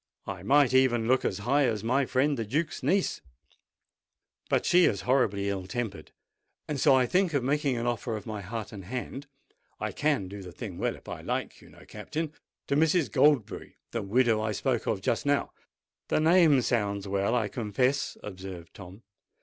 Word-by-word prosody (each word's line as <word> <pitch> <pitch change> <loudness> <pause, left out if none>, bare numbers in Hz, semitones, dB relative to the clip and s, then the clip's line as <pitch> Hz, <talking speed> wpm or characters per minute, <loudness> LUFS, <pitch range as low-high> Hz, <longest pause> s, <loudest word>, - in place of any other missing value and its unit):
I 95 -2 -6
might 135 +5 +4
even 125 -3 +3
look 130 +1 +3
as 95 - -1
high 140 +3 +3
as 110 -4 -2
my 130 +3 +1
friend 140 +3 +2
the 115 - -2
Duke's 150 +10 -2
niece; 185 +9 +1 1.3
but - - +1
she 180 0 +5
is 100 - +1
horribly 105 -4 +1
ill 95 -2 -3
tempered, 100 -6 -5 0.6
and 145 -2 -3
so 135 - +5
I 130 -1 +4
think 180 +2 +1
of 135 - +1
making 140 -1 0
an 115 - -2
offer 120 -1 -2
of 105 - -10
my 105 -2 -5
heart 110 +3 -6
and 100 -4 -9
hand—I 135 +5 -8
can 145 -10 0
do 100 +2 -8
the 90 -2 -9
thing 95 -1 -7
well - - -1
if - - -18
I - - -6
like, - - -4
you - - -16
know, - - -17
Captain—to 155 -2 -5
Mrs. 160 - +2
Goldberry, 145 -6 +2 0.2
the 115 - -2
widow 110 +2 +2
I 110 0 -1
spoke 120 +3 -1
of 100 -4 0
just 115 - 0
now." 145 0 +1 0.6
"The - - +1
name 160 -4 +5
sounds 100 -4 -1
well, 100 +4 0
I 115 -4 +1
confess," 125 +5 -1
observed 95 -4 -8
Tom. 100 +2 -12
120 Hz, 180 wpm, -28 LUFS, 100-140 Hz, 1.3 s, she